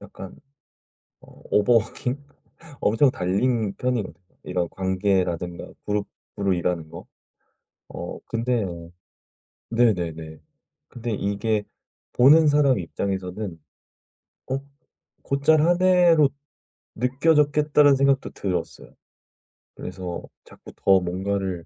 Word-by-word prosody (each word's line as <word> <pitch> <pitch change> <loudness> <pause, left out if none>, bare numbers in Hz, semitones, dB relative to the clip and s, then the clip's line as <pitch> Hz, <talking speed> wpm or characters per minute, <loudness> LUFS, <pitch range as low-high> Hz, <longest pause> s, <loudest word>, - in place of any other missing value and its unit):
약간 95 - -11 0.9
어 - - -18
오버 105 +4 +4
워킹? 125 +5 -1 0.6
엄청 115 +6 +3
달린 105 +3 0
편이거든요. 125 -7 -2 0.3
이런 90 -2 -2
관계라든가 95 -2 -1 0.2
그룹으로 100 -1 -3
일하는 85 -2 -2
거. - - -10 0.8
어 - - -7
근데 115 -2 -1 1.0
네네네 85 -9 0 0.5
근데 120 -1 -6
이게 105 +1 -1 0.5
'보는 150 +6 +6
사람 145 -6 +3
입장에서는 95 0 -4 0.9
"어 130 - 0 0.6
곧잘 140 +3 +2
하네."로 175 -3 +4 0.7
느껴졌겠다.'라는 145 +2 +3
생각도 135 0 +2
들었어요. 95 -3 -5 0.8
그래서 90 -2 -6 0.2
자꾸 - - -15
더 95 -1 +4
뭔가를 95 -1 -3
105 Hz, 220 characters per minute, -24 LUFS, 95-135 Hz, 1.0 s, 보는